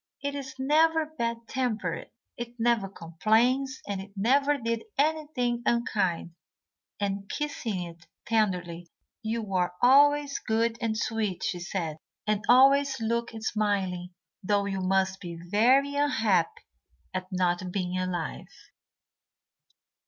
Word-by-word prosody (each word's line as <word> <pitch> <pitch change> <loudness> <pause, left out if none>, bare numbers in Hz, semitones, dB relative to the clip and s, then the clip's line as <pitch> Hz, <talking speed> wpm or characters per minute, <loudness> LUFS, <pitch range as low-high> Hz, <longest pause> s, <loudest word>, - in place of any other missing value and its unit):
"It 285 0 -1
is 270 -2 -6
never 315 +4 +3
bad 235 -6 -4
tempered; 220 -10 -2 0.3
it 240 0 -7
never 225 -4 +2
complains, 225 +11 +1
and 200 -2 -3
it 200 +1 -11
never 275 +8 +3
did 230 -3 -2 0.2
anything 285 -5 0
unkind," 195 -9 0 0.7
and, 200 -1 -2
kissing 230 -10 -3
it 170 0 -11 0.2
tenderly, 180 -6 0 0.3
"you 220 -3 -3
are 180 -1 +1
always 285 +2 +5
good 225 +1 0
and 220 -2 0
sweet," 215 -4 -2
she 180 - -1
said, 170 -3 -3 0.3
"and 215 -1 0
always 270 +1 +6
look 235 +1 -1
smiling, 195 -5 -1 0.3
though 200 0 +1
you 195 -1 -2
must 190 0 +1
be 170 -3 -6
very 240 +11 +3
unhappy 225 - +1 0.5
at 185 0 -3
not 180 0 0
being 180 -1 -2
alive." 180 -3 -3
220 Hz, 120 wpm, -28 LUFS, 185-260 Hz, 0.7 s, always